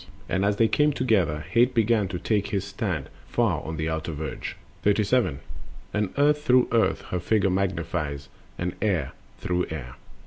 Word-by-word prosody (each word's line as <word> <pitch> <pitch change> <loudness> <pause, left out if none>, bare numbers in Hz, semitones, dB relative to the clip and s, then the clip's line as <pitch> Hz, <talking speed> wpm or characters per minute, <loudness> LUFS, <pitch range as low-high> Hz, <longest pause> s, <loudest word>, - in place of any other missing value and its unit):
And 95 - 0
as 100 0 +2
they 115 +2 +4
came 150 +5 +3
together, 95 - +1
Hate 120 +6 +3
began 110 -2 +3
To 90 -1 -4
take 105 +2 0
his 100 -1 -1
stand 95 -7 -3 0.2
far - - +1
on 80 0 -5
the 80 +1 -1
outer 80 0 -2
verge. 75 +1 -5 0.3
Similia 105 -1 +4
similibus. 105 - +2
37. - - -12 0.5
And 105 -2 0
Earth 150 +1 +4
through 125 -4 +4
Earth 115 -1 +2
her 90 - 0
figure 100 0 +2
magnifies, 85 -6 -2 0.3
And 90 0 -2
Air 90 -10 +1 0.3
through 90 0 -1
Air. 70 -6 -6
95 Hz, 175 wpm, -26 LUFS, 80-110 Hz, 0.5 s, they